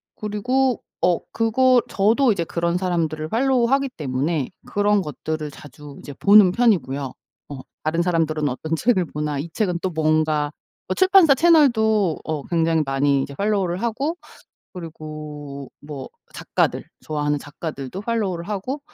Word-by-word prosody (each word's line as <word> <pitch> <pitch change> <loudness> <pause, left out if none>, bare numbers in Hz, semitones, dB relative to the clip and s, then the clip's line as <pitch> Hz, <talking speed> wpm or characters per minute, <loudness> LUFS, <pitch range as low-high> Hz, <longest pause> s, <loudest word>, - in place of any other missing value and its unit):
그리고 245 +5 0 0.2
어 180 -1 +3
그거 245 +2 +3
저도 225 +5 +3
이제 170 -4 0
그런 170 +1 -1
사람들을 165 -4 -1
팔로우하기 265 +2 +2
때문에 145 - -2 0.2
그런 205 0 +1
것들을 155 -1 -5
자주 145 0 -12
이제 145 - -9
보는 200 +4 +6
편이고요. 145 - +1 0.4
어. 140 -2 -7 0.2
'다른 160 +2 0
사람들은 160 -4 0
어떤 155 +6 -3
책을 185 0 +2
보나. 150 -1 -3
이 165 +4 -5
책은 180 -6 -1
또 185 - -1
뭔가.' 155 -2 +1 0.4
출판사 375 -5 +6
채널도 220 - +3
어 155 -3 -3
굉장히 165 -2 +1
많이 135 0 +1
이제 140 - -7
팔로우를 195 -2 0
하고 265 +8 -1 0.6
그리고 150 -5 -8
뭐 145 -2 -8 0.2
작가들 - - -1 0.2
좋아하는 145 -1 -1
작가들도 145 +2 -7
팔로우를 205 -6 -2
하고 235 +8 -3
170 Hz, 315 characters per minute, -22 LUFS, 150-220 Hz, 0.6 s, 보는